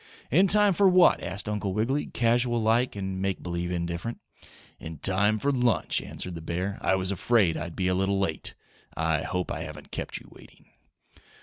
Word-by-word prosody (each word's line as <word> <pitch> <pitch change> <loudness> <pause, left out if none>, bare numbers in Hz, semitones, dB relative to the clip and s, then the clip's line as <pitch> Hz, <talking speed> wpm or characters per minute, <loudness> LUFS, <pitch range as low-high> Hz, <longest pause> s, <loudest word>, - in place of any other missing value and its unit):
"In 185 +9 +5
time 205 0 +6
for 195 +2 +4
what?" 180 -1 +5
asked 95 +5 -5
Uncle 105 -2 -2
Wiggily, 130 +7 0
casual 120 0 +1
like 115 +3 +1
and 95 -1 -4
make 95 -1 -2
believe 85 0 -3
indifferent. 85 +5 -4 0.6
"In 80 -1 -8
time 100 +6 +3
for 140 +6 0
lunch," 125 -5 +1
answered 90 - -5
the 85 - -7
bear. 90 +5 -3
"I 95 - +2
was 95 0 -2
afraid 100 -2 +2
I'd 80 +2 -5
be 95 - -1
a 90 - +2
little 95 +1 0
late. 90 -5 -3 0.4
I 80 -2 +1
hope 90 -1 -3
I - - -4
haven't - - -9
kept - - -4
you - - -12
waiting." - - -18
95 Hz, 185 wpm, -27 LUFS, 90-120 Hz, 0.6 s, time